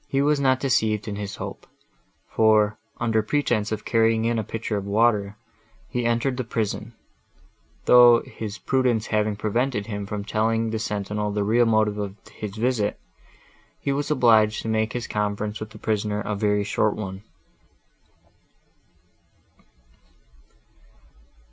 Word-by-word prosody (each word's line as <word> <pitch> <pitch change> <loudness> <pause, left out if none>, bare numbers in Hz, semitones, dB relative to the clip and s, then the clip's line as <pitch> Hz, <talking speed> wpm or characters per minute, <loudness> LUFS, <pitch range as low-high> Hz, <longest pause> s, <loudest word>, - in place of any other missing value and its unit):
He 135 - 0
was 150 0 +2
not 130 -2 +3
deceived 110 -6 +1
in 105 - -3
his 100 -1 -5
hope; - - -8 0.6
for, 110 -1 +3 0.2
under 115 -2 +1
pretence 110 -3 0
of 110 -1 -4
carrying 115 -1 +2
in 115 0 +1
a - - -1
pitcher 110 +1 -4
of 100 -1 -3
water, 105 -1 +2 0.5
he 120 -1 -1
entered 120 +2 0
the 130 - -1
prison, 110 0 -3 0.9
though, 120 -1 +7
his 110 -1 -7
prudence 125 -4 +1
having 105 -1 0
prevented 110 +1 -1
him 100 -2 -5
from 100 0 -4
telling 115 +2 0
the 110 - -2
sentinel 105 -1 -2
the 105 0 -1
real 115 +3 +3
motive 110 -2 +2
of 100 -1 -4 0.2
his 105 -2 -7
visit, 110 -3 0 0.8
he 140 - -2
was 145 +1 -2
obliged 110 -6 +4
to - - -5
make 110 0 0
his 120 -1 -3
conference 105 0 -2
with 110 - -6
the 110 - -13
prisoner 105 -1 -1
a 105 - -3
very 105 0 +1
short 105 +1 0
one. 95 -2 -6
110 Hz, 140 wpm, -24 LUFS, 105-115 Hz, 0.9 s, though